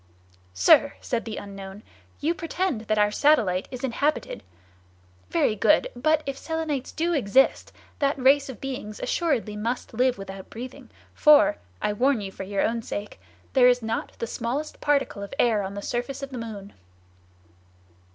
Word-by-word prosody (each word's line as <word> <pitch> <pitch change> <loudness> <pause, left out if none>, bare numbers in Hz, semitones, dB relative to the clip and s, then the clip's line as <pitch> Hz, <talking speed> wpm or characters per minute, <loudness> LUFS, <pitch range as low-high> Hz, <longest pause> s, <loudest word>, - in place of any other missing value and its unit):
"Sir," 95 - +5
said 235 -2 -3
the 220 -2 -5
unknown, 195 0 -8 0.4
"you 320 +4 +1
pretend 335 -6 -2
that 215 - +1
our 210 0 +3
satellite 215 -9 +3
is 255 -1 -8
inhabited. 280 +4 -1 0.9
Very 215 - +2
good, 305 +9 +3
but 310 +5 +2
if 275 -1 -4
Selenites 320 -5 -3
do 340 +2 -1
exist, 265 -2 +2 0.3
that 280 0 +1
race 275 +2 +4
of 255 - -8
beings 250 -6 -6
assuredly 270 -11 -1
must 230 +4 -3
live 250 +1 +2
without 195 -1 -9
breathing, 250 +3 -9 0.2
for—I 90 - +3
warn 255 +3 +2
you 195 -2 -5
for - - -9
your 195 +1 -1
own 230 +1 0
sake—there 205 - -1
is 250 -1 +3
not 225 +1 -3
the - - -3
smallest 250 +7 -4
particle 280 -8 +1
of 200 +6 -7
air 225 -4 +3
on 195 0 -5
the 200 - -6
surface 255 +3 -3
of 275 - -6
the 255 - -5
moon." 210 -3 -7
240 Hz, 155 wpm, -25 LUFS, 205-275 Hz, 0.9 s, Sir